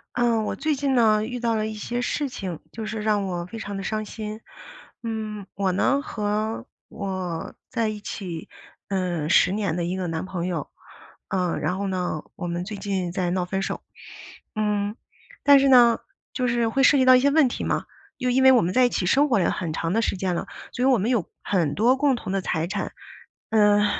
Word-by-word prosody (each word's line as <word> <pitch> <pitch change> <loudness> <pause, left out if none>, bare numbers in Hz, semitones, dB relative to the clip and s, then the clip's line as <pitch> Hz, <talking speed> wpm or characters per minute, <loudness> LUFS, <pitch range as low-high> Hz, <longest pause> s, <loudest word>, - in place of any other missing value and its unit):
呃， 235 -3 +2
我 - - -2
最 310 -1 0
近 275 -1 0
呢， 215 -3 +4
遇 245 +2 -5
到 230 -1 +1
了 215 -1 0
一 220 - -4
些 240 +3 -3
事 285 +3 -1
情， 185 - -6
就 220 +4 -6
是 215 0 -4
让 210 -2 +1
我 175 -2 -3
非 225 +5 -8
常 205 -2 -5
的 - - -4
伤 215 +2 -2
心。 215 0 -6 0.6
嗯， 215 -3 -4
我 195 -2 0
呢 270 +9 +2
和 215 -1 -2 0.2
我 185 -4 -4 0.2
在 230 -3 0
一 215 -1 -4
起， 185 -5 -6 0.4
嗯， 180 -5 -1
10 185 - +5
年 200 -5 -1
的 175 0 -1
一 180 +2 -2
个 185 -1 -2
男 165 +3 -3
朋 180 -2 -3
友， 170 -5 -3 0.6
嗯， 180 -3 0
然 185 +1 -1
后 200 - -2
呢 180 -5 -2
我 - - -4
们 175 0 -2
最 205 +3 -6
近 195 -3 -2
在 180 0 -1
闹 180 0 0
分 190 +1 -2
手。 - - -3 0.7
嗯， 210 -1 0 0.5
但 285 -1 +8
是 275 - +3
呢 240 -3 +6 0.3
就 255 -1 0
是 235 -1 +1
会 270 +4 +1
涉 280 +2 +6
及 260 - +3
到 255 - +9
一 - - +4
些 280 +2 +3
问 295 -2 +5
题 - - -4
嘛， - - 0 0.3
又 255 - -1
因 255 +2 +3
为 265 0 +8
我 250 - +6
们 180 -1 -1
在 255 - +5
一 245 - +3
起 180 - -1
生 285 +8 +3
活 230 - +4
了 175 - +2
很 170 -4 -3
长 165 +3 -2
的 225 - +2
时 195 - -1
间 185 -1 0
了， - - -3 0.3
所 250 - -3
以 - - +4
我 260 -3 +5
们 210 +5 0
有 235 -8 +2 0.2
很 165 -7 0
多 240 - +4
共 275 -1 +2
同 235 - -6
的 195 - 0
财 160 -2 -1
产。 200 +3 -3 0.6
呃， 210 -1 +5
210 Hz, 235 characters per minute, -24 LUFS, 185-240 Hz, 0.7 s, 到